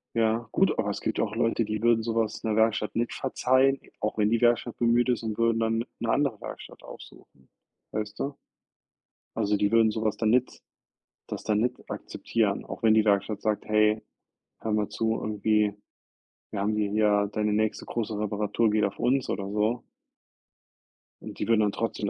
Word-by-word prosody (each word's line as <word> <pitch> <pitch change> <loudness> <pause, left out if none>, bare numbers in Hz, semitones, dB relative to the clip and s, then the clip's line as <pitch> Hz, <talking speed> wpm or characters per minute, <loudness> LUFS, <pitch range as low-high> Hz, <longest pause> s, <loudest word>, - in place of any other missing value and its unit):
Ja, 115 0 +1
gut, - - +2
aber - - 0
es - - -4
gibt - - -2
ja - - +3
auch 105 - -4
Leute, 115 -1 +1
die 110 +1 -3
würden 115 -1 +4
so 115 0 -3
was 115 -2 -1
'ner 110 -2 0
Werkstatt 110 -2 +1
nicht 120 +1 -1
verzeihen, 130 +1 +2 0.2
auch 105 +1 -2
wenn 105 0 +2
die 115 - +2
Werkstatt 120 0 +2
bemüht 120 +1 +3
ist, 120 - +1
und 110 -1 -4
würden 115 0 +2
dann 115 +1 0
'ne 115 - -2
andere 135 -4 +1
Werkstatt - - -9
aufsuchen, 65 -1 -14 0.4
weißt 105 -1 -4
du? 140 0 -3 1.0
Also 105 -2 +1
die 100 +1 +1
würden 115 -1 +5
so 110 +1 -3
was 110 -1 0
dann 110 -1 +2
nicht 125 +2 +1 0.7
das - - -6
dann 105 -1 +1
nicht 125 +2 0
akzeptieren, - - -2
auch - - -8
wenn 110 -1 +5
die 110 0 +4
Werkstatt 100 +1 +1
sagt: 105 -1 -1
„Hey, 105 0 +2 0.6
hör 110 - -2
mal 105 -1 0
zu”, 110 0 0
irgendwie, 105 0 +1 0.8
„wir 105 - -3
haben 105 +2 0
hi 105 -1 0
hier 105 -1 +2
deine 105 -1 0
nächste 110 0 0
große 110 -2 -3
Reparatur 105 +1 0
geht 105 0 +2
auf 100 - -2
uns”, 130 +2 +1
oder 100 -1 -3
so. 105 +4 0 1.4
Und - - -9
die - - -2
würden 115 -1 +4
dann 105 -1 +2
trotzdem 105 -2 -2
110 Hz, 190 wpm, -27 LUFS, 105-115 Hz, 1.4 s, würden